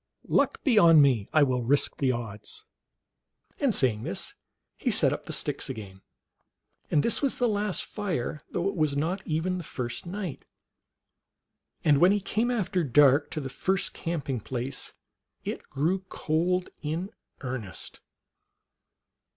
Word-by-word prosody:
Luck -, -, +1 dB
be 250 Hz, -6 st, +3 dB
011 165 Hz, -5 st, +8 dB
me, 130 Hz, -8 st, +4 dB
I 155 Hz, -, +5 dB
will 130 Hz, -2 st, +1 dB
risk 140 Hz, +5 st, +2 dB
the 135 Hz, -2 st, +2 dB
odds." 120 Hz, -, -6 dB, 0.9 s
And, 280 Hz, -, +2 dB
saying 115 Hz, -6 st, +2 dB
this, -, -, -4 dB, 0.4 s
he -, -, -1 dB
set -, -, +4 dB
up -, -, -6 dB
the -, -, -4 dB
sticks -, -, -2 dB
again; 95 Hz, -3 st, -7 dB, 0.9 s
and 145 Hz, -, +3 dB
this 230 Hz, -, +3 dB
was 275 Hz, -2 st, +2 dB
the 245 Hz, -, +2 dB
last 205 Hz, -3 st, 0 dB
fire, 170 Hz, -, -3 dB
though 175 Hz, +2 st, -1 dB
it 195 Hz, -, -2 dB
was 155 Hz, -4 st, +1 dB
not 170 Hz, +7 st, -1 dB
even 170 Hz, +4 st, 0 dB
the -, -, -6 dB
first 125 Hz, +2 st, -5 dB
night. 185 Hz, -4 st, -5 dB, 1.4 s
And 145 Hz, -3 st, +5 dB
when 180 Hz, +4 st, +6 dB
he 205 Hz, -, +2 dB
came 215 Hz, +4 st, 0 dB
after 190 Hz, -7 st, 0 dB
dark 145 Hz, +1 st, +5 dB
to 155 Hz, -, -4 dB
the 135 Hz, -, -4 dB
first 190 Hz, +8 st, -1 dB
camping 145 Hz, -7 st, -3 dB
place 125 Hz, +4 st, -4 dB, 0.5 s
it -, -, -5 dB
grew 160 Hz, +8 st, 0 dB
cold 175 Hz, +4 st, 0 dB
in 165 Hz, +7 st, -3 dB, 0.3 s
earnest. 125 Hz, -, -6 dB
155 Hz, 150 wpm, -28 LUFS, 130-185 Hz, 1.4 s, 011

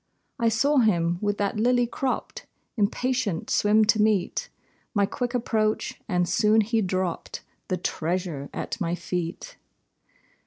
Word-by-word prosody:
I 230 Hz, -1 st, +3 dB
saw 275 Hz, +7 st, +2 dB
him, 175 Hz, -8 st, +2 dB
with 205 Hz, -1 st, 0 dB
that 205 Hz, +1 st, -1 dB
lily 245 Hz, +2 st, +3 dB
cropped, 255 Hz, +2 st, -3 dB, 0.3 s
Impatient 225 Hz, -3 st, 0 dB
swim 215 Hz, +1 st, +4 dB
to 215 Hz, 0 st, +3 dB
meet 210 Hz, -4 st, +1 dB, 0.5 s
My 200 Hz, -1 st, +4 dB
quick 245 Hz, +4 st, -3 dB
approach, 220 Hz, -3 st, 0 dB
and 180 Hz, -1 st, +1 dB
soon 215 Hz, +4 st, +4 dB
he 225 Hz, +1 st, +1 dB
dropped 185 Hz, -3 st, -2 dB, 0.2 s
The 185 Hz, -, -1 dB
treasure 170 Hz, -4 st, -2 dB
at -, -, -5 dB
my 170 Hz, -1 st, 0 dB
feet. 180 Hz, -, -5 dB
210 Hz, 130 wpm, -26 LUFS, 180-230 Hz, 0.5 s, swim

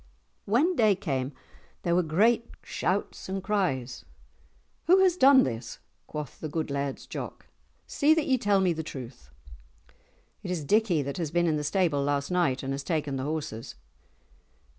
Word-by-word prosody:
When 285 Hz, -, +2 dB
day 215 Hz, -6 st, +4 dB
came, 135 Hz, -8 st, -2 dB, 0.5 s
there 170 Hz, -, +1 dB
were 180 Hz, -, +4 dB
great 220 Hz, +9 st, +2 dB
shouts 185 Hz, +1 st, -2 dB
and 190 Hz, 0 st, -3 dB
cries. 135 Hz, -, -1 dB, 0.8 s
"Who 365 Hz, +3 st, +7 dB
has 365 Hz, -2 st, +4 dB
done 275 Hz, -5 st, +7 dB
this," 115 Hz, -2 st, -4 dB, 0.3 s
quoth 150 Hz, -2 st, -6 dB
the 155 Hz, -, -5 dB
good 155 Hz, -1 st, -3 dB
Laird's 140 Hz, -1 st, -3 dB
Jock; -, -, -7 dB, 0.4 s
"see 310 Hz, +2 st, +3 dB
that 320 Hz, -2 st, 0 dB
ye 260 Hz, -2 st, +2 dB
tell 205 Hz, -3 st, +2 dB
me 180 Hz, -2 st, +2 dB
the 160 Hz, -, -4 dB
truth." 125 Hz, -, -9 dB, 1.1 s
"It -, -, -7 dB
is 175 Hz, -4 st, -2 dB
Dickie 185 Hz, -2 st, +2 dB
that 140 Hz, 0 st, -5 dB
has 165 Hz, -4 st, -2 dB
been 175 Hz, +2 st, +1 dB
in 155 Hz, -2 st, +1 dB
the 150 Hz, -, -3 dB
stable 150 Hz, -1 st, +1 dB
last 140 Hz, +2 st, -1 dB
night, 160 Hz, -8 st, +1 dB
and 135 Hz, 0 st, -2 dB
has 140 Hz, -, -3 dB
taken 150 Hz, -2 st, -2 dB
the 130 Hz, -, -3 dB
horses." 145 Hz, -7 st, -4 dB
165 Hz, 165 wpm, -28 LUFS, 140-205 Hz, 1.1 s, Who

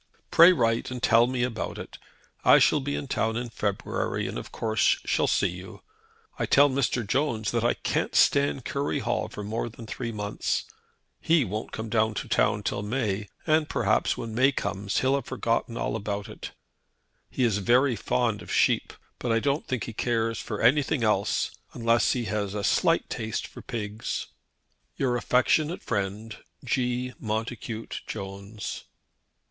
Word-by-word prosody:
"Pray 170 Hz, +2 st, +9 dB
write 115 Hz, -9 st, +1 dB
and 125 Hz, -1 st, -6 dB
tell 115 Hz, +1 st, +5 dB
me 125 Hz, -1 st, -1 dB
all -, -, +3 dB
about 110 Hz, -, -5 dB
it. -, -, -9 dB, 0.4 s
I -, -, +8 dB
shall 150 Hz, -, +4 dB
be 145 Hz, +1 st, -3 dB
in 140 Hz, -, -4 dB
town 110 Hz, -2 st, 0 dB
in 120 Hz, -1 st, -4 dB
February, 100 Hz, -3 st, -2 dB
and -, -, -4 dB
of -, -, -10 dB
course 110 Hz, -2 st, +2 dB
shall -, -, +2 dB
see -, -, +2 dB
you. 90 Hz, +2 st, -10 dB, 0.6 s
I -, -, 0 dB
tell 145 Hz, 0 st, +5 dB
Mr. 130 Hz, -3 st, 0 dB
Jones 115 Hz, -2 st, 0 dB
that 115 Hz, -1 st, 0 dB
I 120 Hz, -, +2 dB
can't -, -, -2 dB
stand 140 Hz, -2 st, +3 dB
Curry 140 Hz, +1 st, -1 dB
Hall -, -, -1 dB
for 105 Hz, -, -7 dB
more 110 Hz, +3 st, -3 dB
than 115 Hz, 0 st, -11 dB
three 115 Hz, +2 st, -4 dB
months. 105 Hz, -1 st, -2 dB, 0.5 s
He 160 Hz, -5 st, +3 dB
won't 105 Hz, +2 st, -4 dB
come 110 Hz, 0 st, -5 dB
to 110 Hz, -1 st, +2 dB
town -, -, +2 dB
till -, -, -2 dB
May, 105 Hz, -3 st, -2 dB, 0.2 s
and 155 Hz, -1 st, +2 dB
perhaps -, -, +1 dB
when 115 Hz, -, -5 dB
May 130 Hz, +4 st, +4 dB
comes 100 Hz, -6 st, -2 dB
he'll 130 Hz, +1 st, +2 dB
have 140 Hz, -, 0 dB
forgotten 115 Hz, -2 st, -1 dB
all -, -, -1 dB
about 100 Hz, +1 st, -3 dB
it. 110 Hz, -, -8 dB, 0.8 s
He 130 Hz, -, -1 dB
is 110 Hz, -4 st, +2 dB
very 125 Hz, +5 st, +3 dB
fond 110 Hz, -1 st, 0 dB
of -, -, -9 dB
sheep, -, -, +2 dB, 0.3 s
but 120 Hz, -, -1 dB
I 115 Hz, -, +3 dB
don't 140 Hz, +5 st, -1 dB
think 125 Hz, -5 st, -2 dB
he 115 Hz, -, -6 dB
cares 115 Hz, 0 st, 0 dB
for 105 Hz, -, -5 dB
anything 135 Hz, +2 st, +3 dB
else, 105 Hz, -2 st, +1 dB, 0.2 s
unless 115 Hz, -1 st, +2 dB
he 120 Hz, -2 st, -2 dB
has 100 Hz, -1 st, -2 dB
a 105 Hz, -, -2 dB
slight -, -, +2 dB
taste 110 Hz, -1 st, -3 dB
for -, -, -11 dB
pigs. 110 Hz, -1 st, -4 dB, 0.7 s
"Your 125 Hz, -2 st, +1 dB
affectionate 150 Hz, +7 st, +2 dB
friend, 105 Hz, +1 st, -3 dB, 0.3 s
"G. 125 Hz, 0 st, -1 dB
MONTACUTE 110 Hz, +1 st, -4 dB
JONES." 100 Hz, 0 st, -6 dB
115 Hz, 170 wpm, -27 LUFS, 105-125 Hz, 0.8 s, Pray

